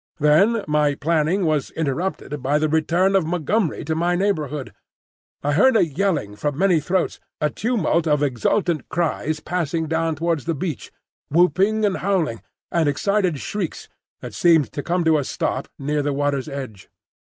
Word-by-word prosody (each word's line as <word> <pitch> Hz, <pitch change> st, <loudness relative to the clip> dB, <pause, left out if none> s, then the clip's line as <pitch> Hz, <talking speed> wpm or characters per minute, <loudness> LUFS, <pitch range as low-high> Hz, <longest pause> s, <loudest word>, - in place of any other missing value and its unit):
Then 195 Hz, +10 st, +3 dB
my 150 Hz, -1 st, +2 dB
planning 165 Hz, +5 st, +1 dB
was 155 Hz, -4 st, 0 dB
interrupted 150 Hz, -1 st, -3 dB
by 140 Hz, +3 st, +1 dB
the 155 Hz, +1 st, +1 dB
return 170 Hz, +5 st, +2 dB
of 190 Hz, -, +4 dB
Montgomery 175 Hz, +2 st, -1 dB
to 160 Hz, -, -1 dB
my 170 Hz, +2 st, +1 dB
neighbourhood. 155 Hz, -8 st, -2 dB, 0.7 s
I 145 Hz, +1 st, +1 dB
heard 260 Hz, -, +4 dB
a -, -, +4 dB
yelling 155 Hz, -, -1 dB
from 145 Hz, +5 st, -2 dB
many 185 Hz, -2 st, +3 dB
throats, 175 Hz, +5 st, -1 dB, 0.2 s
a 150 Hz, -1 st, 0 dB
tumult 195 Hz, -8 st, 0 dB
of 150 Hz, -1 st, +2 dB
exultant 155 Hz, -, 0 dB
cries 155 Hz, -2 st, -1 dB
passing 165 Hz, -2 st, -2 dB
down 160 Hz, 0 st, 0 dB
towards 165 Hz, -2 st, -1 dB
the 165 Hz, -1 st, -1 dB
beach, 150 Hz, -2 st, -5 dB, 0.4 s
whooping 190 Hz, +7 st, +3 dB
and 200 Hz, -, 0 dB
howling, 175 Hz, -, -1 dB, 0.3 s
and 165 Hz, -3 st, +2 dB
excited 185 Hz, +2 st, 0 dB
shrieks 200 Hz, -6 st, -4 dB, 0.3 s
that -, -, -8 dB
seemed 165 Hz, -4 st, +3 dB
to 145 Hz, -, -4 dB
come 175 Hz, +3 st, 0 dB
to 160 Hz, -2 st, +3 dB
a -, -, -1 dB
stop 130 Hz, +1 st, -2 dB
near 145 Hz, +2 st, -1 dB
the 145 Hz, 0 st, -1 dB
water's 140 Hz, -2 st, -1 dB
edge. 130 Hz, -8 st, -7 dB
160 Hz, 160 wpm, -22 LUFS, 145-180 Hz, 0.7 s, of